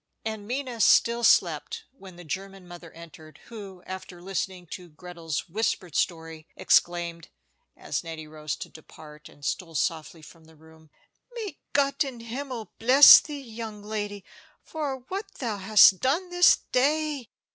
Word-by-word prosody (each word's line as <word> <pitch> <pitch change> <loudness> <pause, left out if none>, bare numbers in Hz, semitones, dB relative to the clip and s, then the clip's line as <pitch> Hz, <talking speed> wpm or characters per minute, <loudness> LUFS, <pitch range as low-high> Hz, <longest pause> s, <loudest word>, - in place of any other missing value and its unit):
And 220 -2 -5
Minna 250 -2 -4
still 235 +4 +4
slept 460 - +2
when 195 -9 -14
the 175 - -12
German 195 +2 -7
mother 175 -1 -12
entered, 160 -1 -14
who, 200 -5 -10
after 185 -1 -8
listening 185 0 -4
to 180 -2 -8
Gretel's 165 0 -6
whispered 185 -3 -2
story, 160 -2 -3
exclaimed, 170 -1 +1 0.5
as - - -4
Nettie 160 -1 -8
rose 155 -1 -6
to - - -9
depart, 150 -1 -14
and 145 - -14
stole 165 -3 -4
softly 160 0 -3
from 160 +1 -16
the 160 0 -19
room: 160 0 -20 0.5
"May 420 -9 -6
Gott 280 0 +2
in 260 -4 -8
Himmel 245 -1 -6
bless 260 +5 +9
thee, 290 -2 -8
young 225 -4 -8
lady, 205 -2 -5 0.4
for 280 -5 -5
what 395 +2 -6
thou 230 -5 -4
hast 195 -1 +6
done 335 +8 -1
this 355 0 +6
day! 290 -1 0
195 Hz, 145 wpm, -26 LUFS, 165-250 Hz, 0.5 s, bless